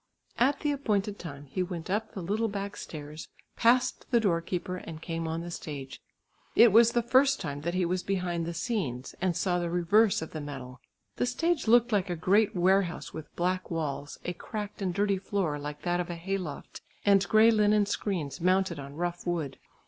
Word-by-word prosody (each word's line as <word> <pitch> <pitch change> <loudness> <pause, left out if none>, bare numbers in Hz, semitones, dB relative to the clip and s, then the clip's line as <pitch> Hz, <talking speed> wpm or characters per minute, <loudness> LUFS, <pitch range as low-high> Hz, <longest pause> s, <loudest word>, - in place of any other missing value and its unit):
At 275 +4 +3
the 295 - +1
appointed 210 -7 -1
time 145 -4 -8
he 145 +7 -3
went 175 -3 -4
up 210 +4 -2
the 190 - -4
little 215 +6 0
back 200 -1 -4
stairs, 150 0 -8 0.3
passed 245 +2 +2
the 240 - +4
door 180 -7 +2
keeper 180 +1 -3
and 165 -3 -8
came 165 0 -4
on 160 +1 -2
the 175 0 -6
stage. 140 -5 -7 0.5
It 235 -1 +8
was 230 +2 +6
the 240 - +2
first 265 +3 +4
time 145 -4 -4
that 170 +3 -2
he 185 -1 +2
was 180 +1 0
behind 175 -3 -2
the 170 - -3
scenes, 155 - -2
and 185 -3 +1
saw 180 -2 +1
the 175 -1 -2
reverse 180 +3 +3
of 160 - -8
the 155 - -5
medal. 135 -3 -8 0.4
The 245 - +1
stage 330 +4 0
looked 240 +1 +5
like 200 -3 +1
a 175 - -1
great 200 +6 +3
warehouse 180 -4 +1
with 155 -1 -9
black 185 +1 -1
walls; 145 -3 -3
a 180 - -2
cracked 210 +3 -6
and 190 -2 0
dirty 200 +1 +1
floor 185 -6 -1
like 145 0 -7
that 175 0 0
of 180 - -2
a 175 - -3
hay 195 +4 -2
loft, 155 -6 -7 0.2
and 200 -1 +4
grey 220 +1 +6
linen 210 -1 +4
screens 175 -8 -3
mounted 185 -2 +2
on 140 0 -8
rough 175 +2 -3
wood. 160 -6 -2
180 Hz, 200 wpm, -29 LUFS, 165-210 Hz, 0.5 s, It